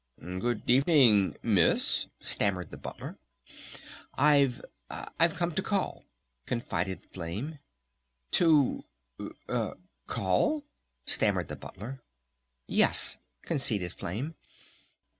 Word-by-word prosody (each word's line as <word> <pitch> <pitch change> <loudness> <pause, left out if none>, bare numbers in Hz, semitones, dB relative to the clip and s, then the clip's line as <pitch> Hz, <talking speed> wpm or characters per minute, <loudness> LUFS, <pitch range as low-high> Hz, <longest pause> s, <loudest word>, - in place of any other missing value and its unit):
"Good 95 +8 -3
evening, 125 - +5
Miss!" 100 -7 +3
stammered 95 -4 0
the - - -8
Butler. - - -8 1.0
"I've 140 -4 +4 0.3
I've 165 0 0
come 170 0 -1
to 190 - 0
call," 200 -1 -2 0.4
confided 95 -6 -2
Flame. 100 - -6 0.7
"To 155 -6 +4 1.2
call?" 95 - +1 0.4
stammered - - +2
the - - -4
Butler. 130 +7 -9 0.6
"Yes," - - +4 0.2
conceded 100 -9 0
Flame. 125 - -4
120 Hz, 85 wpm, -29 LUFS, 95-150 Hz, 1.2 s, evening